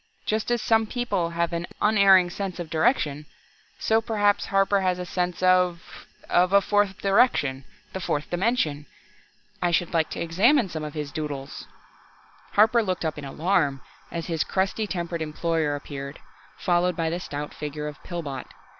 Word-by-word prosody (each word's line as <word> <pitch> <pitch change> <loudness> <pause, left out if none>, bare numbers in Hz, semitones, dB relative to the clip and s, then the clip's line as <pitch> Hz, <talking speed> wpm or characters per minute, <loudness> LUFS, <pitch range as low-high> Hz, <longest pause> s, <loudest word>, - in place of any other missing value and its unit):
Just 215 +1 -1
as 240 -1 0
some 225 -1 +3
people 225 -8 -1
have 170 0 -1
an 170 +1 -3
unerring 195 -4 +5
sense 190 -1 -5
of 170 -2 -6
direction, 155 - +1 0.5
so 220 0 +2
perhaps 205 -2 +1
Harper 195 0 +2
has 185 -1 +1
a 180 - -5
sense 180 0 -2
of 180 -2 +1 0.2
of 180 +2 +3
a 200 - +8
fourth 205 -1 +1
direction 195 - +2 0.3
the 190 - -3
fourth 150 -4 -2
dimension! 175 - 0 0.7
I 175 - +2
should 175 0 0
like 160 -2 +2
to - - -6
examine 205 - +3
some 155 -2 -5
of 150 0 -6
his 150 -2 -4
'doodles'." 145 -2 -5 0.9
Harper 220 +3 +5
looked 185 -5 -2
up 155 -2 -2
in 145 - -7
alarm 145 -2 0 0.3
as 170 -1 -4
his 165 -3 -1
crusty 195 +3 -1
tempered 170 -3 -3
employer 160 -1 -1
appeared, 140 -1 -7 0.4
followed 180 0 +1
by 165 -1 -1
the 175 - -2
stout 145 -3 -6
figure 150 0 -5
of 150 - -8
Pillbot. 150 -7 -6
175 Hz, 165 wpm, -25 LUFS, 155-195 Hz, 0.9 s, a